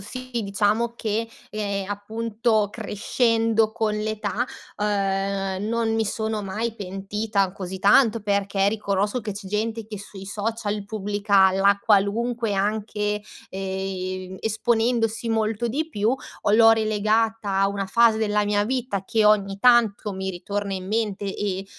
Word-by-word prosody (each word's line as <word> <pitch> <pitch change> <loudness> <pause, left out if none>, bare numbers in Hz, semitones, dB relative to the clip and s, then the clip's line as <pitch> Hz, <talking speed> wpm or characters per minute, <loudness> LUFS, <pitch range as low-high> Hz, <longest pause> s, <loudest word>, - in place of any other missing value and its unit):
sì, 255 +6 -8
diciamo 210 +4 +1
che, 225 +1 -2 0.2
ehm, 200 -2 -3
appunto, 220 +1 0
crescendo 225 0 +1
con 220 -1 -1
l'età, 215 0 -2 0.3
uhm, 195 -1 -1
non 230 -1 0
mi 225 0 +1
sono 220 0 -2
mai 215 +4 -3
pentita 195 0 -2
così 190 -1 -6
tanto 225 +3 +5
perché 200 -1 +1
riconosco 205 +2 -1
che 210 - -5
c'è 200 0 -8
gente 220 +2 -2
che 215 -1 -7
sui 195 -1 -10
social 210 0 -3
pubblica 205 -2 +2
la 200 +1 +3
qualunque 225 +2 +1
anche, 210 +1 -1 0.3
ehm, 190 -1 -4
esponendosi 225 +1 0
molto 225 +1 0
di 310 +7 -2
più, 215 -7 0 0.3
o - - 0
l'ho 225 +1 +7
rilegata 220 -1 +1
a 195 - +4
una 200 -1 -3
fase 230 +1 +4
della 210 -1 +1
mia 205 0 +1
vita 240 -5 -2
che, 220 +1 +1
ogni 200 -2 +3
tanto, 225 -4 +4
mi 190 0 -3
ritorna 200 +3 -4
in 185 0 -6
mente 210 -2 -1
e 195 -1 -3
210 Hz, 140 wpm, -24 LUFS, 200-225 Hz, 0.3 s, l'ho